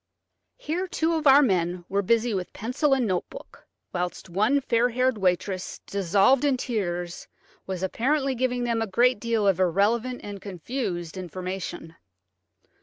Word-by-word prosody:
Here 365 -4 -3
two 330 -1 0
of 315 -2 0
our 280 +2 +8
men 180 -5 0
were 200 +1 0
busy 230 +3 +1
with 185 -2 -4
pencil 270 +6 +1
and 255 -3 0
note 185 -4 -1
book, - - -13 0.3
whilst 180 0 -4
one 215 +10 +3
fair 245 -2 +2
haired 255 -1 +1
waitress, 185 0 -1
dissolved 200 +7 +3
in 280 -3 +2
tears, 175 -8 -3 0.4
was 190 -1 -4
apparently 270 +8 0
giving 250 0 -1
them 235 -1 0
a 225 - -1
great 240 +4 +3
deal 225 -3 0
of 190 -2 +3
irrelevant 215 +8 +1
and 200 -1 -7
confused 185 - -4
information. 180 -2 -6
215 Hz, 150 wpm, -26 LUFS, 185-255 Hz, 0.4 s, our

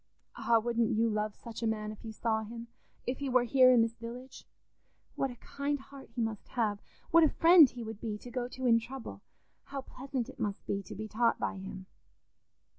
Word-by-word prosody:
"Ah, 230 - +3
wouldn't 235 0 +1
you 230 +1 +3
love 215 -1 -1
such 230 0 -9
a 230 - +1
man 215 -1 -2
if 215 - -11
you 225 - -6
saw 220 0 0
him—if 235 +3 -8
he 280 -1 -2
were 255 -1 +4
here 255 +1 +6
in 240 -2 +6
this 225 0 -3
village? 245 +3 -9 0.7
What 270 - -1
a 245 - -8
kind 280 +4 -3
heart 270 0 -13
he 240 - -1
must 220 -2 -4
have! 215 -4 -1 0.3
What 335 0 +7
a 310 - +6
friend 330 -3 +7
he 240 -1 -7
would 220 -1 -7
be 215 -3 -3
to 245 +3 -11
go 245 -1 -2
to 260 +1 -6
in 230 -2 +6
trouble! 255 +2 -8 0.4
How 275 -1 -5
pleasant 260 -2 -4
it 265 - -12
must 205 -4 -3
be 200 - -1
to 210 +2 -9
be 215 +3 -5
taught 230 +2 +2
by - - -2
him. 190 0 -7
235 Hz, 210 wpm, -31 LUFS, 220-255 Hz, 0.7 s, What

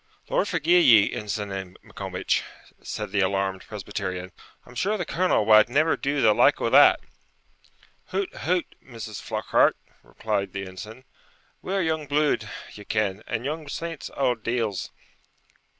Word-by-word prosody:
'Lord - - +2
forgie 170 +1 +3
ye, 110 -10 +6
Ensign 100 -3 -5
Maccombich,' - - -2 0.4
said - - -5
the 100 - 0
alarmed 95 0 0
Presbyterian; 95 -3 -5 0.3
'I'm 125 - -14
sure 200 - 0
the 175 - -3
colonel 170 - +1
wad 110 +1 +6
never 155 +6 +3
do 140 0 -1
the 110 -2 +6
like - - +4
o' - - -1
that!' - - +7 1.0
'Hout! 195 0 -3
hout! 180 0 0 0.2
Mrs. 110 -4 -8
Flockhart,' - - +2 0.2
replied 100 -3 -3
the 100 0 -4
ensign, 105 +7 -10 0.6
'we're 195 0 -1
young 160 -2 -1
blude, 145 -7 +1 0.2
ye 105 - -10
ken; 105 -2 -1
and 115 - -3
young 155 +1 -4
saints, 165 0 -5
auld 125 -4 +1
deils.' 115 -5 -2
115 Hz, 140 wpm, -25 LUFS, 100-155 Hz, 1.0 s, that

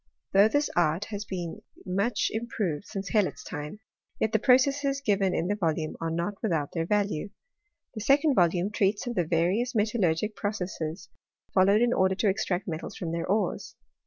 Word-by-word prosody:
Though 200 +2 +7
this 290 +6 +1
art 170 +3 +2
has 205 0 -4
been 175 -4 -5 0.2
much 200 +4 0
im 225 +2 -3
proved 195 -8 -3
since 195 -2 -5
Hellot's 205 -7 +1
time, 150 +10 -7 0.4
yet 220 - +1
the 220 - +2
processes 275 +3 +3
given 200 -7 +1
in 170 - 0
this 205 +2 -1
volume 160 -3 -1
are 165 - -1
not 170 +5 -3
without 165 -10 -1
their 165 -1 -2
value. 205 -3 0 0.6
The 220 - -6
second 280 +5 +4
volume 180 -1 +2
treats 205 +1 +1
of 245 - -3
the 180 - +1
various 185 +10 +1
metallurgic 210 -2 +1
processes 180 -5 -4 0.5
fol 185 -1 +5
lowed 205 +3 +4
in 240 0 +2
order 190 0 +2
to 205 +2 +2
extract 190 -1 -1
metals 160 -1 -5
from 170 -3 -4
their 170 0 -3
ores. 205 +3 -1
200 Hz, 180 wpm, -27 LUFS, 175-220 Hz, 0.6 s, Though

